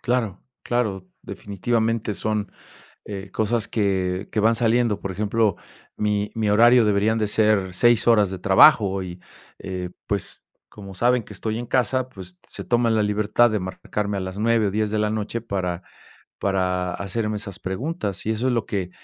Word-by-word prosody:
Claro, 115 -6 -1 0.2
claro. 105 -6 -1 0.2
Definitivamente 110 +1 -2
son, 105 -1 -2 0.5
eh, 100 -1 -7
cosas 110 0 0
que 95 -3 -1
que - - -3
van 115 +2 +4
saliendo. 115 -2 +1
Por 100 - -4
ejemplo, 105 0 0 0.4
mi 105 0 0
mi 110 -2 0
horario 120 +3 +6
deberían 105 +2 +2
de 105 - +1
ser 105 -4 +2
6 120 +2 +3
horas 105 -5 +4
de 95 - -5
trabajo 95 - +5
y, 90 -1 -8 0.4
eh, 90 -1 -5 0.2
pues 100 -3 -4 0.2
como 100 -2 -11
saben 120 +4 +2
que 105 - -13
estoy 110 +4 -3
en 120 - -5
casa, 130 +1 0
pues 90 -6 -11
se - - -8
toman 120 -1 +2
la 105 - +3
libertad 105 +3 +2
de 110 - 0
marcarme 100 +2 -4
a - - -2
las 95 +1 -5
9 115 -1 +2
o - - 0
10 105 0 0
de 110 - -1
la 105 0 +1
noche 110 +2 -3
para 95 -5 -3 0.6
para 90 -2 0
hacerme 105 +2 -2
esas 100 -5 -6
preguntas. 100 - -4
Y - - +1
eso 115 +4 -1
es - - +1
lo 115 -3 0
que 95 -3 -3
105 Hz, 175 wpm, -23 LUFS, 95-115 Hz, 0.6 s, horario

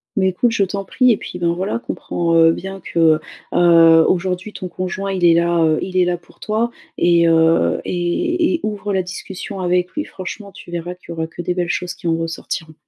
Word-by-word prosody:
Mais, 190 -3 +2
écoute, 230 +6 +1
je 220 -3 +1
t'en 195 +1 -3
prie 255 +5 +3
et 220 - +2
puis, 180 - -8
ben, 170 -1 +1
voilà, 190 +6 -2
comprends, 170 -7 -2
heu, 165 0 +6
bien 190 +3 -6
que, 160 -2 +3 0.3
heu, 165 -2 +6
aujourd'hui, 185 +3 -1
ton 185 - -6
conjoint 185 +2 -4
il 185 -2 -3
est 170 - +7
là, 170 0 +2
heu, 155 -1 +2
il 185 -1 -3
est 180 - +4
là 175 0 0
pour 175 - -23
toi 220 +3 -1 0.3
et 170 -1 +4
heu 165 0 +3
et 325 - 0
et - - -3
ouvre 210 -1 -3
la 190 - +2
discussion 190 +2 -7
avec 180 0 0
lui 300 - -3
franchement, 190 +2 -8
tu 175 - -13
verras 175 +1 -4
qu'il 180 - -22
y - - -4
aura 160 -1 -3
que 165 - -8
des 180 +1 -1
belles 175 -1 -1
choses 180 0 -2
qui - - -7
en 165 - +2
ressortiront. 165 -1 -5
180 Hz, 225 wpm, -19 LUFS, 170-195 Hz, 0.3 s, est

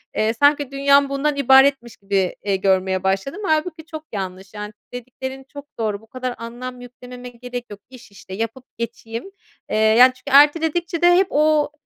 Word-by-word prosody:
eee, 220 +1 +1
sanki 285 +2 +2
dünyam 280 0 +3
bundan 280 +2 -1
ibaretmiş 270 -3 +4
gibi, 195 -2 -1
eee, 200 -1 0
görmeye 190 -1 0
başladım. 195 - -2
Hâlbuki 315 0 -1
çok 315 -1 -9
yanlış, 190 0 -6
yani 210 0 -7 0.2
dediklerin 260 +2 -7
çok 285 0 -9
doğru, 215 -2 -2
bu 225 - -20
kadar 255 +1 -5
anlam 245 +2 -8
yüklememe 250 0 -11
gerek 245 0 -8
yok, 205 -1 -10
iş 255 -4 -15
işte 190 -1 -12
yapıp 230 +5 -5
geçeyim, 230 - -6 0.4
eee, - - -2
yani, 225 +4 +6
çünkü 270 +2 +3
erteledikçe 325 +3 +2
de 350 0 +6
hep 380 +1 +3
o 300 0 +2
250 Hz, 165 wpm, -21 LUFS, 220-285 Hz, 0.4 s, yani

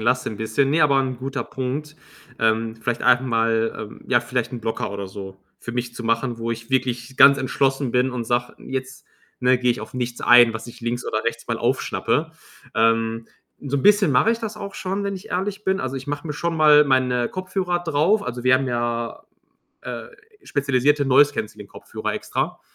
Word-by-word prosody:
lasse, 125 +3 +1
'n 110 - -6
bisschen. 110 +6 0
Ne, 160 +3 +2
aber 140 -2 +4
'n 130 -1 -1
guter 135 +1 -4
Punkt, 145 +4 -5 0.4
ähm, 110 0 +1
vielleicht 115 +1 -3
einfach 125 - +4
mal, 115 -2 +1
ähm, 105 - -8
ja, 120 -2 +4
vielleicht 125 +1 -3
'n 120 - -5
Blocker 110 -2 -3
oder 100 -1 -5
so 95 0 -9 0.2
für 120 - -7
mich 120 0 -3
zu 120 - -7
machen, 115 +1 -1
wo 115 0 -3
ich 115 0 -5
wirklich 125 -1 -1
ganz 140 0 +8
entschlossen 135 0 0
bin 125 +1 +2
und 125 -2 -4
sage: 120 +1 -1
„Jetzt, 130 0 -6 0.3
ne, 125 0 +4
gehe 125 0 +2
ich 120 - -2
auf - - -9
nichts 125 -1 -3
ein, 120 -1 +7
was 110 +1 -6
ich 120 0 -12
links 120 +1 -3
oder 110 - -1
rechts 115 0 -3
mal 115 -1 -2
aufschnappe.“ 140 +5 0 0.4
Ähm. 115 0 +1 0.3
So'n 140 -1 -2
bisschen 205 -4 +5
mache 140 - +4
ich 230 - -4
das 220 -1 -5
auch 200 -1 -7
schon, 195 +2 -3
wenn 200 0 -2
ich 185 - -9
ehrlich 195 +3 -2
bin. 190 0 +1
Also, 130 -4 -3
ich 135 +1 -6
mache 145 +2 -4
mir 150 - -3
schon 165 +3 -2
mal 150 -1 +7
meine 125 -3 +1
Kopfhörer 185 -1 -2
drauf. 165 +7 +2
Also, 125 0 -5
wir 130 +1 +5
haben 135 +1 +1
ja, 120 -1 -2 0.6
äh, - - -6 0.4
spezialisierte 140 - +1
Noise 140 +2 +5
Cancelling 105 -1 -5
Kopfhörer - - -6
extra, - - -3
125 Hz, 200 wpm, -22 LUFS, 115-145 Hz, 0.6 s, ganz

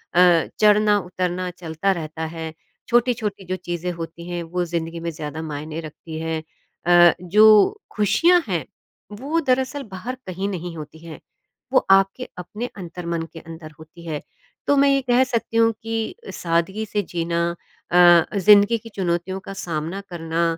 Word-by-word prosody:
अ, 175 -2 +5
चढ़ना 210 0 +5
उतरना 180 0 -3
चलता 170 +2 -2
रहता 160 -2 -4
है। 160 -1 -5 0.4
छोटी-छोटी 230 -5 +1
जो 185 - -2
चीज़ें 180 -1 -4
होती 170 0 -8
हैं, 175 -1 -3
वो 175 +2 -2
ज़िंदगी 170 0 -4
में 170 0 -3
ज़्यादा 155 0 -6
मायने 155 +2 -5
रखती 160 +1 -8
है 160 0 -2 0.5
अ, 175 -1 +7
जो 215 - +5 0.2
ख़ुशियाँ 340 - +4
हैं, - - -1 0.5
वो 275 +10 -2
दरअसल 265 +1 0
बाहर 230 +8 -5
कहीं 190 +2 -3
नहीं 175 -2 -5
होती 155 +1 -9
हैं, 160 -2 -9 0.5
वो - - +4
आपके 195 +6 +3
अपने 210 +7 -6
अंतर्मन 170 -2 -4
के 165 - -8
अंदर 160 -1 -10
होती 165 +2 -14
है। 150 -2 -3 0.5
तो 285 - +4
मैं 280 0 +5
ये 275 0 +3
कह 250 0 +3
सकती 230 -3 -2
हूँ 230 0 +5
कि 225 0 -3 0.2
सादगी 170 +6 -1
से 210 0 -1
जीना 170 0 -1 0.5
अ, 175 -1 +7
ज़िंदगी 205 +4 +6
की 225 +1 -12
चुनौतियों 185 0 -1
का 195 - -5
सामना 170 0 -4
करना 165 -1 -2
180 Hz, 155 wpm, -22 LUFS, 165-210 Hz, 0.5 s, अ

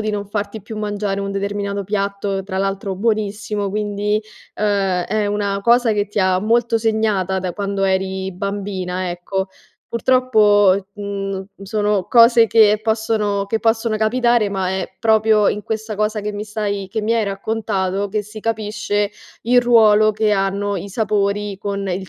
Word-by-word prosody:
di 215 - -2
non 205 -1 -3
farti 205 0 -4
più 220 0 -7
mangiare 205 -1 -2
un 200 0 -3
determinato 200 0 -3
piatto, 200 -1 -2
tra 190 -1 -6
l'altro 195 0 -2
buonissimo, 210 -1 -1
quindi, 210 +1 -1 0.4
uhm, 195 -4 +1
è 210 0 -1
una 200 -1 -1
cosa 235 0 +4
che 205 0 0
ti 205 - -4
ha 185 -1 +3
molto 230 +1 +2
segnata 215 -4 0
da 180 -1 -3
quando 200 -1 -2
eri 190 0 -1
bambina, 185 -2 -3
ecco. 190 +2 -3 0.4
Purtroppo, 210 -6 +3
mhmm, 195 -2 -4
n 195 - -12
sono 210 -1 0
cose 230 -1 +6
che 215 -1 +4
possono 220 -2 0
che 220 +3 -1
possono 225 -1 0
capitare, 235 -1 +2
ma 190 -2 -2
è 190 0 -4
proprio 220 -2 +3
in 210 - -2
questa 220 -1 -4
cosa 215 0 0
che 210 +1 -4
mi 205 +1 -5
stai 205 -2 -3
che 220 +1 -3
mi 225 +2 +1
hai 225 -2 +1
raccontato, 200 -1 -2
che 210 +1 -2
si 210 +1 -10
capisce 210 -2 -1 0.3
il 245 +2 +4
ruolo 215 -3 +5
che 215 0 +1
hanno 200 0 0
i 195 +3 -6
sapori 205 -1 -1
con 200 0 -3
il 185 +1 -3
205 Hz, 165 wpm, -19 LUFS, 195-215 Hz, 0.4 s, cose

